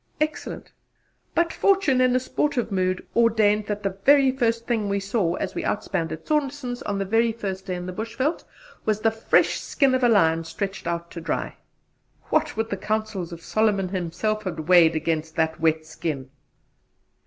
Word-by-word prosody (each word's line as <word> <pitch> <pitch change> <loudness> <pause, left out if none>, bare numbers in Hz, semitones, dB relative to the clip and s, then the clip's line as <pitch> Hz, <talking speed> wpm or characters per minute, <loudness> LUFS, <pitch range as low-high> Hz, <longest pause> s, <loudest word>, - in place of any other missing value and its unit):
Excellent! 305 0 -3 0.6
But 335 0 +2
fortune 385 -10 +3
in 255 0 +3
a - - +4
sportive 255 -2 -1
mood 185 -1 0
ordained 215 -3 +3
that 210 0 -3
the 195 -1 -3
very 275 -2 +6
first 230 -3 0
thing 220 -4 0
we 200 0 0
saw 195 -3 0
as 190 - -3
we - - -3
out 210 - -1
spanned 165 -5 -2
at 160 0 -7
Saunderson's 280 -4 -1
on 205 -1 -2
the 195 - -1
very 225 +3 +2
first 195 -4 -5
day 185 - -2
in 180 0 -5
the 185 - -5
Bushveld, 230 - -2 0.4
was 215 -1 0
the 225 - +3
fresh 225 0 +2
skin 275 -3 +1
of 260 0 +1
a 245 - +5
lion 165 -6 +3
stretched 195 +3 -5
out 170 0 -3
to 170 - -7
dry. - - -3 0.8
What - - +1
would 225 0 -1
the 200 - -1
counsels 210 -3 -2
of 170 -1 -9
Solomon 210 -4 +1
himself 185 +4 -2
have 160 -4 -4
weighed 170 -3 +6
against 160 0 -2
that 160 0 0
wet 160 -1 +1
skin? 140 -4 -5
205 Hz, 185 wpm, -24 LUFS, 170-235 Hz, 0.8 s, very